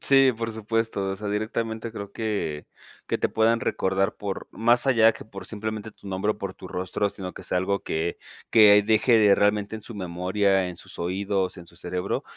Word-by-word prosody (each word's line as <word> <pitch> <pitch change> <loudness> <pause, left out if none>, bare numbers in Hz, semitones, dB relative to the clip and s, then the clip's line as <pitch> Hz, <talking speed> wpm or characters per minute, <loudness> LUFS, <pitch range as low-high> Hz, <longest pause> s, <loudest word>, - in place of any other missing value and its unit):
Sí, 135 -1 +5
por 115 0 -3
supuesto. 110 -1 -1
O 95 - -3
sea, 105 +1 -5
directamente 110 +2 -2
creo 100 -2 -8
que 100 -9 -3 0.4
que - - -1
te - - +1
puedan 115 +1 +3
recordar 95 -5 0
por, 100 -2 -5
más 120 +3 +3
allá 115 -4 +6
que - - -11
por 100 -3 -10
simplemente 110 0 -4
tu 105 - -17
nombre 95 +2 -1
o 105 - -3
por 100 -2 -5
tu 95 - -11
rostro, 95 +3 -2
sino 95 -2 -7
que - - -10
sea 90 - 0
algo 100 +2 0
que 80 +2 -2 0.3
que 105 -2 +7
deje 110 +3 +4
de 105 -2 +6
realmente 105 +1 +1
en 110 - -7
su 115 +2 -5
memoria, 95 +1 +1
en 90 - -8
sus - - -8
oídos, 95 +1 -1
en 85 -2 -11
su 85 - -14
cerebro. 90 +1 -3
105 Hz, 205 wpm, -25 LUFS, 95-110 Hz, 0.4 s, que